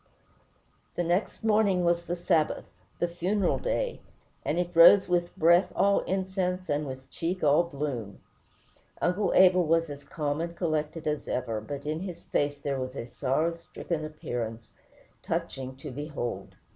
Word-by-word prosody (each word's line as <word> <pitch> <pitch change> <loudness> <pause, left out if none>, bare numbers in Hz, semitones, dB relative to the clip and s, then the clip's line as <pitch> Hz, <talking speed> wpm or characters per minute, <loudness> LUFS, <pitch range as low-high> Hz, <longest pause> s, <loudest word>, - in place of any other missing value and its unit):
The 175 - 0
next 175 +6 -1
morning 210 -5 +3
was 170 0 +2
the 175 0 -3
Sabbath, 170 -3 +1 0.3
the 175 - +1
funeral 180 +3 0
day, - - -2 0.4
and 150 - -1
it 175 0 -2
rose 175 +4 +8
with 175 -1 0
"breath 170 +3 +5
all 200 0 +4
incense 185 -1 -2
and 145 0 0
with 130 0 -8
cheek 175 +2 -3
all 145 +2 +5
bloom." 140 - -4 0.8
Uncle 180 +4 +1
Abel 185 -1 +6
was 165 -1 +1
as 140 0 -8
calm 145 +1 -2
and 170 0 -4
collected 155 -2 -2
as 150 -1 -2
ever; 115 -3 -2
but 140 +5 -7
in 155 +1 -2
his 175 -2 -7
face 145 0 0
there 140 -1 -2
was 130 0 -4
a 115 - -4
sorrow 140 +7 0
stricken 165 -1 -5
appearance 120 -7 -5 0.5
touching 130 -1 -3
to 135 +2 -8
behold. 145 -3 -5
165 Hz, 155 wpm, -28 LUFS, 145-180 Hz, 0.8 s, rose